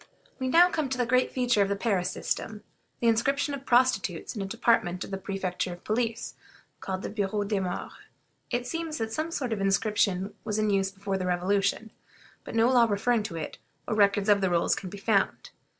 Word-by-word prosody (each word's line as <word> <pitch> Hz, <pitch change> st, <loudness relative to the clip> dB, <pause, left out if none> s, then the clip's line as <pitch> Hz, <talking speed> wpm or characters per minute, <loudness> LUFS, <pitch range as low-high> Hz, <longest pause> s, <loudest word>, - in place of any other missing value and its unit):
We 260 Hz, -, -1 dB
now 340 Hz, +7 st, +7 dB
come 305 Hz, -4 st, -1 dB
to 260 Hz, -, -2 dB
the 245 Hz, -, +1 dB
great 255 Hz, +2 st, +2 dB
feature 245 Hz, -4 st, +2 dB
of 195 Hz, -, +2 dB
the 200 Hz, -, +1 dB
Paris 195 Hz, -4 st, 0 dB
system: 215 Hz, +2 st, -4 dB, 0.4 s
the 235 Hz, -, +2 dB
inscription 275 Hz, +6 st, +2 dB
of 275 Hz, -1 st, -7 dB
prostitutes 240 Hz, -7 st, +2 dB
in 210 Hz, -, -3 dB
a 195 Hz, -, -3 dB
department 195 Hz, -5 st, +1 dB
of -, -, -9 dB
the 195 Hz, -, -3 dB
Prefecture 190 Hz, -2 st, -3 dB
of 175 Hz, -, -13 dB
Police, 230 Hz, +1 st, -2 dB, 0.5 s
called 190 Hz, 0 st, -4 dB
the -, -, -3 dB
Bureau 205 Hz, -1 st, -1 dB
des 205 Hz, 0 st, -1 dB
Moeurs. 180 Hz, -2 st, -4 dB, 0.6 s
It 245 Hz, 0 st, -1 dB
seems 320 Hz, +4 st, -3 dB
that 225 Hz, -2 st, -3 dB
some 310 Hz, +5 st, -2 dB
sort 260 Hz, -8 st, -2 dB
of 205 Hz, -, -3 dB
inscription 195 Hz, -1 st, +1 dB
was 210 Hz, -1 st, -2 dB
in 215 Hz, -1 st, +1 dB
use 195 Hz, -1 st, +2 dB
before 195 Hz, 0 st, -4 dB
the 185 Hz, -, -2 dB
Revolution, 195 Hz, +4 st, 0 dB, 0.5 s
but -, -, -8 dB
no 225 Hz, +1 st, +4 dB
law 245 Hz, -2 st, +6 dB
referring 220 Hz, +3 st, +1 dB
to 210 Hz, -5 st, -6 dB
it, 160 Hz, -, -6 dB, 0.3 s
or -, -, -1 dB
records 200 Hz, -1 st, +3 dB
of 205 Hz, -1 st, +4 dB
the 190 Hz, -, +2 dB
rolls, 170 Hz, -1 st, +2 dB
can 190 Hz, -, -4 dB
be 205 Hz, -, -8 dB
found. 200 Hz, -1 st, 0 dB
210 Hz, 210 wpm, -28 LUFS, 195-240 Hz, 0.6 s, now